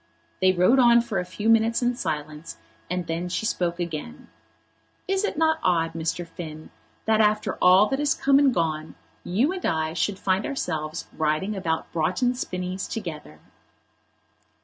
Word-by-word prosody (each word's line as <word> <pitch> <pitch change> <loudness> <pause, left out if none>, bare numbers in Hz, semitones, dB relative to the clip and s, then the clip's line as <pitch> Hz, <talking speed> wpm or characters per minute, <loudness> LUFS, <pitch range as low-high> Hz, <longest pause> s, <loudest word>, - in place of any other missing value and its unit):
They 185 0 +5
rode 185 +9 +4
on 235 -1 +6
for 225 -5 -2
a 180 - -3
few 205 +4 -4
minutes 225 +1 +3
in 245 +1 +2
silence, 155 -4 -5 0.3
and 180 0 -2
then 165 +2 -3
she 185 +5 -2
spoke 175 -4 -1
again. 170 +5 -6 0.8
"Is 390 +1 0
it 415 - -2
not 320 0 +2
odd, 165 -3 +1
Mr. 165 +2 -3
Finn, 155 -2 -9 0.3
that 220 0 +3
after 210 -2 +2
all 185 +3 +7
that 270 - -1
has 290 -1 +1
come 275 0 +4
and 280 -2 +4
gone 160 -6 -2 0.3
you 230 - +1
and 375 -1 -5
I 160 0 0
should 190 +4 -1
find 190 0 0
ourselves 155 - -3
riding 160 +7 0
about 165 -4 -2
Broughton 185 +10 +1
Spinnies 185 -5 -4
together?" 150 - -7
185 Hz, 160 wpm, -25 LUFS, 165-230 Hz, 0.8 s, all